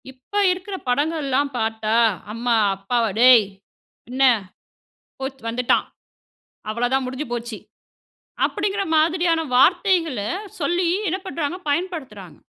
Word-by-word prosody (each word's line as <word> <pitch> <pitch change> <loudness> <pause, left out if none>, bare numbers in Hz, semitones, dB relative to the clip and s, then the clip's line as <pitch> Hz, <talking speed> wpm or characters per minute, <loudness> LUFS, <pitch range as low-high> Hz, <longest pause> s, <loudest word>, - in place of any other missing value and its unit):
இப்ப 260 +7 -19 0.2
இருக்குற 370 +2 -4
படங்கள்லாம் 285 0 0
பார்த்தா, 220 0 -1 0.4
"அம்மா, 235 +1 0 0.2
அப்பாவ 230 +5 -1
டேய் 245 -3 +7 0.6
என்ன? 260 +2 0 1.0
போச்சி 265 0 -5
வந்துட்டான், 240 +1 +1 0.8
அவ்ள 235 +3 -1
தான். 265 0 +1
முடிஞ்சு 260 +4 -5
போச்சு." 235 -2 -4 0.9
அப்படிங்கற 400 0 -1
மாதிரியான 330 +1 +2
வார்த்தைகள 345 - +3 0.4
சொல்லி 345 +4 0 0.2
என்ன 370 - 0
பண்றாங்க? 335 -2 -3
பயன்படுத்துறாங்க. 270 - -4
270 Hz, 100 wpm, -22 LUFS, 240-335 Hz, 1.0 s, டேய்